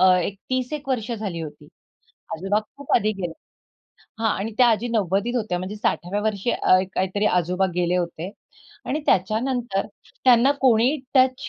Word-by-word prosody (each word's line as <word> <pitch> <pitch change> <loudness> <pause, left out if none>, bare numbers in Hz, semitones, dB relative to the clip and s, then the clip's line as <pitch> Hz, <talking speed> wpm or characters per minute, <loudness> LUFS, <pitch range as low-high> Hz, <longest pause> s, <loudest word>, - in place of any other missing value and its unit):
अ, - - +6
एक 195 +3 -3
30-1 255 +3 -2
वर्ष 245 -3 -1
झाली 205 -6 -4
होती. 155 -2 -8 0.7
आजोबा 195 +5 0 0.2
खूप 285 -1 -7
आधी 215 +1 +2
गेले 180 -4 -4 0.9
हां 225 - +3
आणि 215 +3 -3
त्या 250 - +7
आजी 230 +1 +1
90s 215 +1 0
होत्या, 210 -6 -1
म्हणजे 185 +4 -5
60व्या 205 -1 -1
वर्षी 215 +1 0
अ, 185 - +4 0.2
काहीतरी 190 +3 0
आजोबा 180 +2 +1
गेले 180 0 +1
होते 175 0 -3 0.6
आणि 300 - -1
त्याच्यानंतर 225 +2 +1 0.4
त्यांना 255 +2 +6
कोणीही 255 +3 +4 0.2
टच 260 -1 +3
215 Hz, 150 wpm, -23 LUFS, 185-245 Hz, 0.9 s, त्या